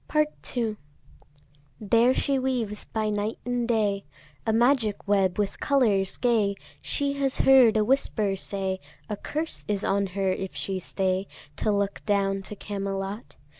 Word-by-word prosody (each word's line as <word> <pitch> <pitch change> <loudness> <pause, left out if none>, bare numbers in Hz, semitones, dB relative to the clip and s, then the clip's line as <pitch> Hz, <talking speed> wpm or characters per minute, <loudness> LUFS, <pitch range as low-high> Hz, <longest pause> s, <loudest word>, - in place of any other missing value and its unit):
Part 305 -3 0
II. 220 -3 0 1.0
There 230 +4 +4
she 275 -1 +1
weaves 240 -5 -2
by 215 -1 -1
night 210 +1 -2
and 245 -1 -1
day 210 -4 +1 0.4
A - - +4
magic 230 -3 +2
web 195 -3 +2
with 205 -1 -1
colours 215 -9 +2
gay. 220 -5 +2 0.3
She 280 -1 0
has 270 -1 +1
heard 250 -5 +6
a 215 - +3
whisper 215 -5 +1
say, 190 -1 -3 0.3
A 210 - -1
curse 310 +9 -4
is 205 -2 -1
on 200 0 +1
her 195 -1 +2
if 190 0 -4
she 190 -1 -2
stay 190 +1 -1 0.3
To 215 - +1
look 200 -1 -1
down 195 -1 +1
to 210 - -4
Camelot. 195 +1 -4
210 Hz, 150 wpm, -26 LUFS, 195-240 Hz, 1.0 s, heard